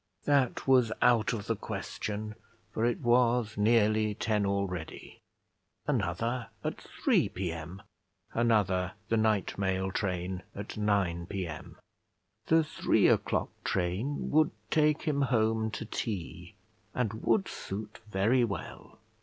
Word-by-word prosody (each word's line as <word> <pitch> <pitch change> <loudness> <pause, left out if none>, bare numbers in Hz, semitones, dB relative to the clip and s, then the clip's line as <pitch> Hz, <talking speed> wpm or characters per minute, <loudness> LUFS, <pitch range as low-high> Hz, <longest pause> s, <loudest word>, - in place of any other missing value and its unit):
That 140 -4 +2
was 125 -4 +5
out 115 -3 +4
of 105 -3 -4
the 115 - 0
question, 105 +1 -5 0.4
for 110 - -2
it 120 - -1
was 120 -2 +3
nearly 110 0 +3
ten 105 -2 0
already. 95 -4 -4 0.6
Another 115 - -1 0.2
at - - -3 0.2
3 - - +4
P.M.; 85 +1 -5 0.5
another, 100 -6 +2 0.2
the 115 - +2
night 110 -4 +1
mail 95 -1 0
train, 90 -1 -2
at 100 +1 -6
9 100 -5 0
P.M. 90 -6 -5 0.7
The 160 0 +5
three 155 - +2
o'clock - - +2
train 95 +11 -1
would 155 +1 +4 0.2
take 150 -1 +3
him 150 -3 0
home 110 -3 +2
to 110 - -5
tea, 105 -5 -5 0.4
and 110 -3 -1
would 195 - +2
suit 105 +2 -6
very 110 +6 +3
well. 105 -4 -5
110 Hz, 120 wpm, -30 LUFS, 95-120 Hz, 0.7 s, was